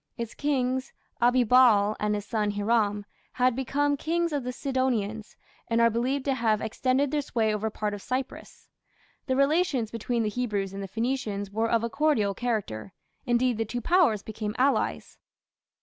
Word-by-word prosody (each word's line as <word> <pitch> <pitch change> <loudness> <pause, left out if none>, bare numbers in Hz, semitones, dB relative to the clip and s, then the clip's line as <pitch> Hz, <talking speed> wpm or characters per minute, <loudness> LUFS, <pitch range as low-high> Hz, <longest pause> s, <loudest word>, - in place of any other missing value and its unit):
Its 235 -1 -5
kings, 260 -3 -1 0.3
Abibaal 240 -4 +5
and 210 0 0
his 205 -1 -4
son 210 -1 -1
Hiram, 205 0 0 0.3
had 250 -1 +2
become 285 +3 0
"Kings 335 +3 -1
of 285 -3 -1
the 250 - -3
Sidonians", 245 -6 -2 0.3
and 230 -1 +1
are 230 0 +5
believed 255 +4 -1
to 275 - +2
have 225 -4 +1
extended 260 +5 0
their 300 -1 +1
sway 225 -6 0
over 215 +1 -1
part 210 -1 -3
of 205 - -6
Cyprus. 255 +3 -5 0.6
The 260 - +1
relations 275 -4 +1
between 230 +1 -1
the 215 - 0
Hebrews 205 -5 -2
and 195 - -5
the 195 - -5
Phoenicians 215 -2 -2
were 225 +2 0
of 230 -1 +2
a 235 - -1
cordial 260 -10 +1
character, 195 - -3 0.3
indeed 240 -1 +2
the - - +2
two 240 +3 -4
powers 280 - +3
became 215 0 -5
allies. 275 +2 0
235 Hz, 165 wpm, -27 LUFS, 210-260 Hz, 0.6 s, Abibaal